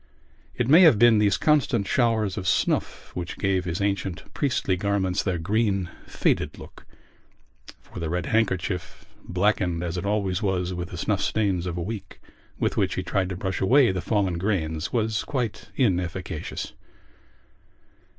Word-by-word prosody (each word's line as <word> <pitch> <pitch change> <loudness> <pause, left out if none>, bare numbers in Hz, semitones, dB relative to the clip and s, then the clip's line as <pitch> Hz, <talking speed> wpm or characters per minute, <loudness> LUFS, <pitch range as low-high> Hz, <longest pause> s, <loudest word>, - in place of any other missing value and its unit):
It 120 - 0
may 160 +7 +7
have 160 - +7
been 115 0 +6
these 105 -1 +3
constant 145 -9 +2
showers 110 -4 +1
of 95 -3 -4
snuff - - 0
which 90 -1 -5
gave 95 -2 0
his 90 +2 -3
ancient 100 -3 -1
priestly 130 -9 0
garments 95 -1 0
their 95 -3 -1
green 100 0 0 0.2
faded - - 0
look - - -13 0.9
for - - -11
the 85 -2 -3
red 90 +2 -1
handkerchief, 95 -5 -1 0.2
blackened, 90 -2 0
as 85 0 -3
it 90 - -3
always 100 -2 0
was, 95 -3 -1
with 90 0 -5
the 90 - -7
snuff 100 +3 0
stains 95 -5 0
of 90 -1 -3
a 85 - -2
week, 100 -1 -7 0.4
with - - -1
which - - +1
he 95 - -2
tried 95 +1 -1
to 95 - -4
brush 95 0 -3
away 125 +4 +5
the 95 -1 -3
fallen 95 -6 0
grains, 85 -5 -1
was 110 -2 0
quite 125 -6 -3
inefficacious. 90 - -2
95 Hz, 160 wpm, -25 LUFS, 90-110 Hz, 0.9 s, may